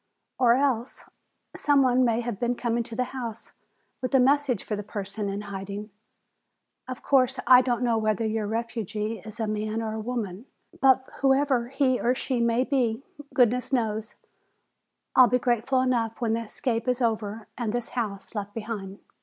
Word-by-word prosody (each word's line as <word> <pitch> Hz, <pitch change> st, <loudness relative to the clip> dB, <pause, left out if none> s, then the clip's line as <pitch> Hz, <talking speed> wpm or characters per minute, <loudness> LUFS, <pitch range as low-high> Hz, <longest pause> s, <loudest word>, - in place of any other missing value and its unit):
"Or 240 Hz, -2 st, +6 dB
else 260 Hz, -2 st, 0 dB, 0.5 s
some 285 Hz, -2 st, +3 dB
one 255 Hz, 0 st, +3 dB
may 235 Hz, -1 st, +2 dB
have 235 Hz, -4 st, -4 dB
been 245 Hz, 0 st, 0 dB
coming 235 Hz, -1 st, -1 dB
to 225 Hz, -, -7 dB
the 250 Hz, -, +1 dB
house 235 Hz, -4 st, -6 dB, 0.5 s
with 255 Hz, +1 st, -1 dB
a -, -, +7 dB
message 270 Hz, -3 st, +2 dB
for 215 Hz, -, -3 dB
the 205 Hz, -, -4 dB
person 205 Hz, 0 st, -5 dB
in 200 Hz, +1 st, -3 dB
hiding. 200 Hz, +1 st, -6 dB, 1.0 s
Of 255 Hz, -1 st, -7 dB
course, 260 Hz, -1 st, +3 dB
I 250 Hz, 0 st, +8 dB
don't 245 Hz, -1 st, -1 dB
know 230 Hz, -2 st, +2 dB
whether 215 Hz, 0 st, 0 dB
your 220 Hz, -1 st, -1 dB
refugee 220 Hz, -1 st, -3 dB
is 215 Hz, +4 st, -11 dB
a 220 Hz, -, 0 dB
man 215 Hz, +1 st, -2 dB
or 220 Hz, -1 st, -3 dB
woman. 220 Hz, -1 st, -4 dB, 0.3 s
But 265 Hz, -1 st, +4 dB
whoever 270 Hz, -3 st, +2 dB
he 265 Hz, -1 st, +1 dB
or 245 Hz, +2 st, +2 dB
she 260 Hz, -1 st, -2 dB
may 235 Hz, +1 st, +2 dB
be, 260 Hz, -3 st, 0 dB, 0.3 s
goodness 250 Hz, 0 st, +3 dB
knows, 220 Hz, -4 st, -1 dB, 1.0 s
I'll 255 Hz, -1 st, +8 dB
be 250 Hz, -, +3 dB
grateful 250 Hz, +1 st, +1 dB
enough 235 Hz, -3 st, 0 dB
when 230 Hz, -2 st, 0 dB
the 230 Hz, 0 st, -2 dB
escape 230 Hz, +2 st, -2 dB
is 250 Hz, 0 st, +1 dB
over 220 Hz, -1 st, -1 dB
and 235 Hz, -4 st, -2 dB
this 240 Hz, 0 st, -3 dB
house 210 Hz, -5 st, -4 dB
left 205 Hz, -2 st, -5 dB
behind!" 210 Hz, -3 st, -5 dB
235 Hz, 170 wpm, -26 LUFS, 215-255 Hz, 1.0 s, I